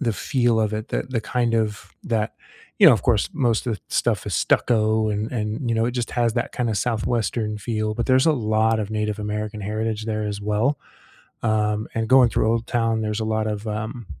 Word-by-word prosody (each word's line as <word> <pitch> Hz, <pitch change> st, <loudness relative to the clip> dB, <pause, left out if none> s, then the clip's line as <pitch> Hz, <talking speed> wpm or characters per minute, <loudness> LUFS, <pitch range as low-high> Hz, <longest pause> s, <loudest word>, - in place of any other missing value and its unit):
the 115 Hz, -7 st, 0 dB
feel 120 Hz, -2 st, +1 dB
of 110 Hz, -1 st, +1 dB
it, 110 Hz, +1 st, -4 dB
the -, -, -1 dB
the 130 Hz, -3 st, -3 dB
kind 120 Hz, +1 st, -1 dB
of 110 Hz, -2 st, -2 dB
that, 110 Hz, -2 st, -1 dB, 0.5 s
you -, -, +8 dB
know, -, -, +9 dB
of -, -, -3 dB
course, 110 Hz, -4 st, +2 dB
most 120 Hz, -6 st, +1 dB
of 115 Hz, -, 0 dB
the 100 Hz, -, -10 dB
stuff -, -, 0 dB
is -, -, -3 dB
stucco 110 Hz, -1 st, +2 dB
and 105 Hz, +1 st, -2 dB
and, 110 Hz, +1 st, -3 dB
you 115 Hz, -, +1 dB
know, 115 Hz, -, +2 dB
it 120 Hz, -, 0 dB
just 120 Hz, -1 st, -3 dB
has 120 Hz, -2 st, +1 dB
that -, -, -2 dB
kinda 120 Hz, -3 st, -1 dB
southwestern 110 Hz, -1 st, -1 dB
feel, 110 Hz, -1 st, -2 dB
but 120 Hz, +2 st, -2 dB
there's 130 Hz, 0 st, +4 dB
a 160 Hz, -, +5 dB
lot 110 Hz, -3 st, +1 dB
of 105 Hz, 0 st, -4 dB
Native 105 Hz, -1 st, -2 dB
American 105 Hz, 0 st, -4 dB
heritage 110 Hz, +1 st, -3 dB
there 110 Hz, -1 st, -2 dB
as 105 Hz, -1 st, -3 dB
well, 105 Hz, +7 st, 0 dB, 0.6 s
um, 105 Hz, -1 st, +1 dB
and 115 Hz, 0 st, -1 dB
going 130 Hz, -2 st, +6 dB
through 110 Hz, -, +1 dB
Old 115 Hz, 0 st, 0 dB
Town, 115 Hz, -2 st, +1 dB
there's 105 Hz, 0 st, -2 dB
a -, -, -1 dB
lot 110 Hz, 0 st, 0 dB
of, 105 Hz, +1 st, -4 dB
um, 110 Hz, +2 st, -4 dB
110 Hz, 220 wpm, -23 LUFS, 105-120 Hz, 0.6 s, know